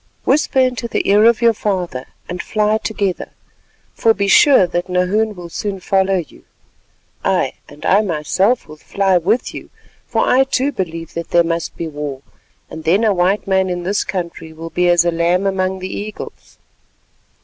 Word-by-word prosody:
Whisper 275 0 +1
into 255 -2 +2
the - - -2
ear 205 +2 +5
of 235 0 +4
your 230 -1 +5
father 180 -11 -3 0.2
and 180 0 -4
fly 215 0 0
together, 200 -5 -2 0.6
for 225 -1 +2
be 200 0 0
sure 260 0 +6
that 175 +1 -3
Nahoon 200 +4 +1
will 175 -1 -8
soon 200 +2 -4
follow 190 +1 +1
you. 170 - -8 0.8
Ay! - - +1 0.2
and 145 - -11
I 200 +3 +4
myself 190 +5 0
with 155 0 -13
fly 195 -2 +1
with 210 +9 0
you, - - -9 0.4
for - - 0
I 260 +1 +5
too 270 +1 0
believe 165 - -5
that 170 0 -5
there 170 - +4
must 165 0 -3
be 170 - -3
war, 145 -3 -6 0.4
and 160 0 -9
then 185 +8 +2
a 215 -2 +3
white 185 +3 +1
man 190 -1 +1
in 175 -1 -3
this 200 +4 0
country 170 -3 -5
will 165 +1 -9
be 180 0 +2
as 175 -1 +4
a 170 - +2
lamb 170 +3 +1
among 190 -1 0
the 190 0 -6
eagles." 210 +1 -8
190 Hz, 180 wpm, -18 LUFS, 170-210 Hz, 0.8 s, sure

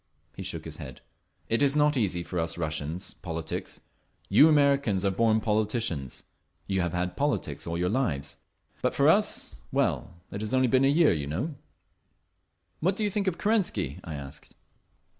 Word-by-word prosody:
He - - -7
shook - - -4
his - - -7
head. - - -9 0.5
"It 115 - +1
is 140 0 +3
not 150 0 +4
easy 95 -8 0
for 90 0 -3
us 80 0 -1
Russians, 80 +2 -3
politics. 80 -3 -5 0.5
You 145 +11 +7
Americans 140 -10 +3
are 100 - +3
born 110 +2 +3
politicians; 105 - -1 0.4
you 95 -1 0
have 85 -1 -1
had 90 0 -1
politics 145 -8 -1
all 85 0 -2
your 90 +1 0
lives. 90 - -1 0.4
But - - 0
for - - +4
us—well, - - 0 0.2
it 100 - -5
has 110 +4 -1
only 130 0 +4
been 130 +2 +4
a - - +5
year, 155 +3 +5
you 75 -4 -3
know!" 100 - -2 1.3
"What 185 +4 +1
do 215 - -1
you 205 - +1
think 200 0 -1
of 180 - 0
Kerensky?" 175 - 0
I 80 - -6
asked. 70 -1 -10
105 Hz, 170 wpm, -28 LUFS, 85-140 Hz, 1.3 s, You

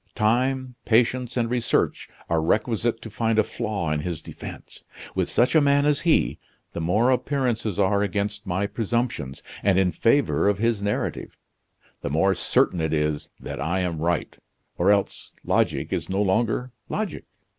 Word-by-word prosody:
Time, 130 +3 +1
patience, 125 +2 +2
and 115 -1 +2
research 125 -2 0 0.2
are 85 -1 +1
requisite 115 +6 0
to 115 - -7
find 115 +1 0
a 110 - +5
flaw 105 -8 -3
in 75 - 0
his 80 0 -3
defense. - - -8 0.3
With - - 0
such 120 - +3
a 160 - +6
man 140 0 +3
as 150 -1 +3
he 165 0 +4
is, - - -6 0.4
the 85 - -3
more 105 +10 +3
appearances 125 -6 0
are 100 0 +3
against 105 0 -2
my 95 +2 0
presumptions, 110 - -2 0.2
and 95 -2 +3
in 95 -2 +3
favor 100 - +2
of 100 - +1
his 115 -1 +1
narrative, 100 0 -2 0.6
the - - -3
more 80 +7 +3
certain 85 -1 +2
it 80 0 0
is 75 -1 -1
that - - -6
I 85 +5 0
am 85 -3 -2
right 85 +1 -1 0.4
or 90 +3 +2
else 100 -1 +1
logic - - 0
is - - -2
no 95 +2 +1
longer 115 +5 0 0.2
logic." 215 -5 -3
105 Hz, 165 wpm, -24 LUFS, 90-120 Hz, 0.6 s, a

